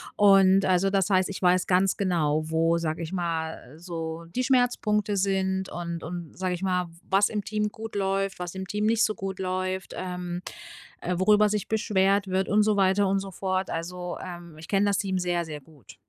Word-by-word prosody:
Und, 195 -1 +6
also 185 +1 +3
das 195 0 +1
heißt, 185 0 +3
ich 195 - -5
weiß 180 0 +3
ganz 185 +1 +3
genau, 155 -5 0
wo, 165 +1 +2
sage 165 0 -2
ich 165 +3 -6
mal, 160 -6 -3
so 165 -1 -6
„die 255 - 0
Schmerzpunkte“ 235 -5 +1
sind 190 -1 0
und 170 -1 -5
und, 170 -1 -7
sage 185 -1 -1
ich 175 - -8
mal, 180 -2 0
„w - - -16 0.2
was 200 +1 +4
im 210 -2 -3
Team 210 +1 -1
gut 225 +1 -8
läuft, 195 -1 -1
was 180 0 -5
im 190 - -4
Team 210 +2 -1
nicht 230 0 +3
so 215 - -1
gut 195 -2 -5
läuft, 185 0 -3
ähm, 180 -1 -4 0.6
äh, 180 - -2
worüber 210 +3 +4
sich 210 -1 -2
beschwert 200 -2 +2
wird“ 190 +1 0
und 210 +1 +4
so 215 -1 +2
weiter 195 0 +3
und 195 0 +1
so 195 0 -7
fort. 185 0 -2
Also, 180 +2 -4
ähm, 175 -3 -9
ich 160 - -11
kenne 195 0 +2
das 200 - +2
Team 190 -2 -1
sehr, 175 -1 -1
sehr 150 -2 -7
gut. 145 -8 -17
185 Hz, 205 wpm, -26 LUFS, 175-195 Hz, 0.6 s, Und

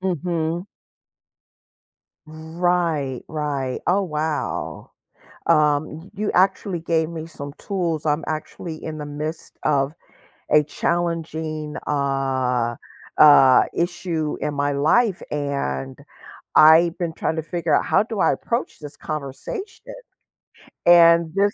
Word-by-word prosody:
Mhm. 175 -1 -2 1.6
Right, 160 -3 -1
right 145 -4 -3
oh, 195 +3 +3
wow. 155 -3 -3 0.6
Um, 150 +1 +2
y 195 - -15
you 210 +1 -2
actually 190 -1 +1
gave 160 -1 0
me 160 -1 -6
some 145 -3 -9
tools, 170 -6 -3
I'm 150 +1 0
actually 155 +1 -6
in 155 -1 -5
the 150 - -5
midst 150 +2 -6
of 140 -1 +1 0.6
a 150 0 +5
challenging, 160 -2 -3
uh 130 -4 0 0.4
uh, 140 -4 +7
issue 170 -3 -2
in 150 - -2
my 145 0 0
life, 180 +9 +2
and 140 - -3 0.6
I've 165 +2 +7
been 170 -2 -2
trying 160 - -2
to 160 - -2
figure 165 +2 -1
out, - - +2
"How - - +3
do 220 -1 -6
I - - +3
approach 235 +2 -3
this 145 -1 -10
conversation?" 160 - -7 0.9
and 170 -1 +6
this 200 +1 +2
160 Hz, 115 wpm, -22 LUFS, 145-175 Hz, 1.6 s, uh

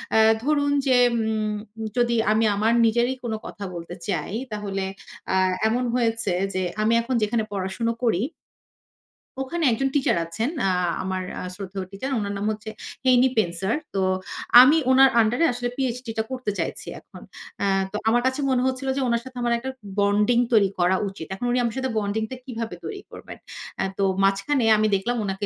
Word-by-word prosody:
আ - - +6 0.3
ধরুন 285 -1 +1 0.2
যে 255 - +4 0.2
উম 220 -1 -1 0.4
যদি 235 -1 +2 0.2
আমি 220 +1 +3
আমার 220 +3 +2
নিজেরই 240 +3 +2
কোনো 220 -2 -2
কথা 205 - -8
বলতে 170 +1 -7
চাই, 180 -2 -2 0.2
তাহলে 200 -2 -3 0.5
আ - - +2 0.3
এমন 245 +3 0
হয়েছে 230 -4 0 0.2
যে 185 - -1 0.2
আমি 220 +2 +3
এখন 250 +2 -2
যেখানে 220 +1 0
পড়াশোনা 200 +4 -2
করি 215 -6 +2 1.2
ওখানে 290 +6 -3
একজন 270 +4 0
টিচার 270 - +2
আছেন, 220 +10 -2 0.2
আ - - +2 0.3
আমার 185 0 -2 0.2
আ - - -5
শ্রদ্ধেয় 190 -1 -6
টিচার। 205 +8 -5
উনার 200 -1 -3
নাম 205 - -3
হচ্ছে 215 +1 -6 0.4
হেনি 255 0 +5
পেন্সার। 190 +1 0 0.2
তো 195 - 0 0.6
আমি 285 +5 +6
উনার 265 +1 +7
আন্ডার 220 +2 +1
এ - - +6
আসলে 245 0 -3
PhD-টা 245 -4 -2
করতে 255 -5 -2
চাইছি - - -3
এখন। - - -15 0.4
আ - - +2 0.3
তো 210 - -8
আমার 240 +1 +3
কাছে 260 +2 -1
মনে 250 - +2
হচ্ছিল 260 +1 -3
যে 275 - 0
উনার 235 -1 +1
সাথে 260 -1 -10
আমার 240 0 +1
একটা 250 +3 -5 0.3
বন্ডিং 205 +4 +3
তৈরি 205 -3 +5
করা 180 +2 +3
উচিত। 190 -4 -8
এখন 195 +6 -4
উনি 250 - +2
আমার 235 -1 -2
সাথে 260 0 -1
বন্ডিংটা 220 +3 -2
কিভাবে 230 -3 -5
তৈরি 400 -2 -6
করবেন। - - -10 0.4
আ - - +1
তো 200 - 0 0.2
মাঝখানে 200 +8 +2
আমি 215 0 +2
দেখলাম 240 +6 -1
উনাকে 195 +1 -3
225 Hz, 175 wpm, -24 LUFS, 200-250 Hz, 1.2 s, উনার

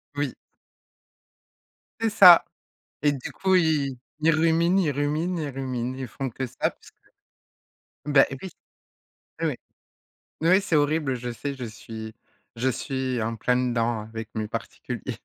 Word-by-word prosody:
Oui. 145 -3 -1 1.7
C'est 225 0 +1
ça, 185 -5 +9 0.6
et 145 - +4
du 135 -3 -5
coup, 190 -1 +1
ils 150 -6 +2 0.2
ils 165 +1 +5
ruminent, 165 +3 +3
ils 155 - +1
ruminent, 150 +6 -1
ils 150 - -3
ruminent, 130 -2 -3
ils 130 -1 -5
font 135 +4 -4
que 130 +3 -4
ça. - - -14
Parce - - -19 0.9
que 150 - -9
bah, 135 -2 +7 0.2
oui! 190 - -6 0.9
Ouais, - - 0 0.9
ouais, 185 +4 +5
c'est 185 -5 0
horrible, 145 -2 +1
je 120 0 -5
sais, 140 +5 -4
je 130 -2 -6
suis 110 0 -8 0.4
je 120 +3 0
suis 130 -1 -2
en 115 +1 -2
plein 125 +3 +1
dedans 120 -3 0
avec 110 0 -7
mes 110 -1 -2
particuliers, - - -5
135 Hz, 145 wpm, -25 LUFS, 120-160 Hz, 1.7 s, ça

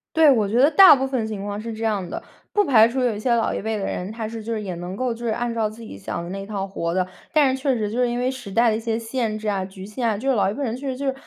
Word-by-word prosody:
对， 320 -2 +7
我 220 -5 +2
觉 230 - 0
得 280 +3 +6
大 375 -5 +9
部 265 0 -1
分 260 -4 -1
情 205 -2 -5
况 205 0 -4
是 230 +1 -5
这 220 +1 -6
样 205 -5 -1
的， - - -5 0.3
不 415 -1 +2
排 225 -6 +6
除 260 +3 -3
有 240 -4 +1
一 - - -6
些 240 +3 0
老 230 - 0
一 - - -3
辈 220 +1 -2
的 195 - -3
人， 185 +3 -4
他 220 -1 -5
是 225 0 -7
就 230 - -5
是 220 - -3
也 195 -3 -4
能 175 +2 -6
够 250 +2 -1
就 230 - -11
是 225 - 0
按 240 +1 -2
照 225 -2 0
自 225 +2 -12
己 220 - -9
想 100 +12 -5
的 170 - -7
那 195 0 -5
套 200 -2 -3
活 170 -3 -3
的。 185 -1 0 0.2
但 285 -5 +3
是 265 - -9
确 270 -2 +1
实 210 -3 -2
就 240 - -2
是 245 - +2
因 240 - -2
为 250 +1 0
时 260 -6 -7
代 230 +3 +3
的 215 - 0
一 - - -4
些 225 -1 -2
限 225 -1 -2
制 215 - -6
啊、 200 -2 0
局 190 0 -9
限 230 +3 -2
啊， 210 - -1
就 265 +6 -2
是 265 - +3
老 200 -3 +2
一 - - -2
辈 285 - -4
人 230 -3 -2
确 275 +2 -7
实 255 - -4
就 280 - -4
是 270 - +1
225 Hz, 385 characters per minute, -23 LUFS, 205-250 Hz, 0.3 s, 大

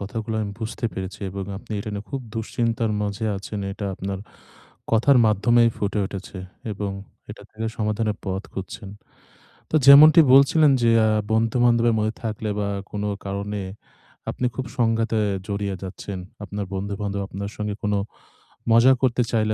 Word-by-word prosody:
কথাগুলো 110 +2 -4
আমি 100 - -4
বুঝতে 110 +2 -5
পেরেছি 95 0 -6
এবং 100 +1 -5
আপনি 105 - -9
এটা 105 - -5
নিয়ে 100 0 -5
খুব 135 -1 -3
দুশ্চিন্তার 115 0 -1
মাঝে 105 +2 -3
আছেন 100 +1 -6
এটা 100 0 -5
আপনার 95 +1 -4 0.7
কথার 120 +5 +5
মাধ্যমেই 115 +3 +4
ফুটে 105 +1 -1
উঠেছে 95 0 -7 0.3
এবং 100 0 -3 0.4
এটা - - -9
থেকে 110 +1 -5
সমাধানের 105 -1 -1
পথ 95 0 -2
খুঁজছেন। 95 +1 -7 0.8
তো - - -8
যেমনটি 150 +3 +10
বলছিলেন 140 +3 +6
যে 115 - +4 0.2
আ - - +3 0.2
বন্ধু-বান্ধবের 115 +1 +3
মধ্যে 110 +1 0
থাকলে 110 -1 -3
বা, 100 -1 -1 0.2
কোনো 105 0 -3 0.2
কারণে 100 +1 -3 0.7
আপনি 125 - -2
খুব 130 - -3
সংঘাতে 115 -1 +1 0.3
জড়িয়ে 100 -1 -2
যাচ্ছেন। 95 +1 -6 0.3
আপনার 100 0 -4
বন্ধু-বান্ধব 100 +1 -3
আপনার 100 +1 -5
সঙ্গে 105 -1 -3
কোনো 105 -1 +1 0.7
মজা 115 +3 +7
করতে 125 -2 +2
চাইলে 110 -2 +1
105 Hz, 145 wpm, -23 LUFS, 100-115 Hz, 0.8 s, যেমনটি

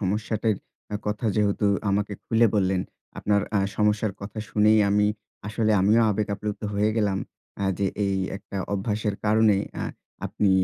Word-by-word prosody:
সমস্যাটির 105 +1 0 0.4
আ - - +2
কথা 105 +2 -1
যেহেতু 105 0 +2 0.2
আমাকে 100 +1 0
খুলে 115 +1 +4
বললেন, 95 -2 +2 0.4
আপনার 100 0 +2 0.2
আ - - +4 0.2
সমস্যার 105 -1 +2
কথা 100 +2 -7
শুনেই 105 +1 +4
আমি 105 0 +3 0.4
আসলে 110 0 +1
আমিও 110 +4 +4
আবেগ 105 0 -1
আপ্লুপ্ত 105 +1 -5
হয়ে 105 +1 +2
গেলাম, 100 -3 +1 0.4
আ - - +1
যে 100 - +1 0.2
এই 100 -1 +1 0.2
একটা 100 0 -9 0.2
অভ্যাসের 105 +1 -1
কারণে 110 -1 +4 0.3
আ - - -1 0.4
আপনি 100 - +1
105 Hz, 150 wpm, -25 LUFS, 100-110 Hz, 0.4 s, খুলে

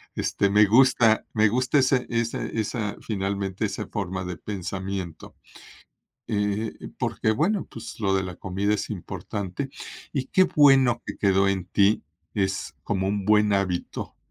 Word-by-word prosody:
este, 100 - 0
me 105 +1 +6
gusta, 115 0 +4
me 110 -1 +4
gusta 130 +5 +2
ese 130 -1 +2
ese 115 -1 -2
esa, 105 -1 -2
finalmente, 100 -2 -2
esa - - -4
forma 95 +1 -3
de 90 -2 -5
pensamiento, 95 -2 -5 0.9
eh, 105 +1 -1 0.3
porque, 110 - 0
bueno, 170 - +1
pues, 115 - -9
lo 100 -3 +1
de 95 -1 +1
la 90 -1 -6
comida 100 +2 -1
es 105 - -4
importante, 100 +4 -5 0.4
y 135 -2 -2
qué 185 - +4
bueno 135 - +5
que - - -5
quedó 100 -1 +3
en 95 -2 -1
ti, 100 +2 +2 0.3
es 95 -5 -1
como 95 -2 -1
un 100 0 -1
buen 105 0 +4
hábito 95 -3 -2
105 Hz, 145 wpm, -25 LUFS, 95-115 Hz, 0.9 s, me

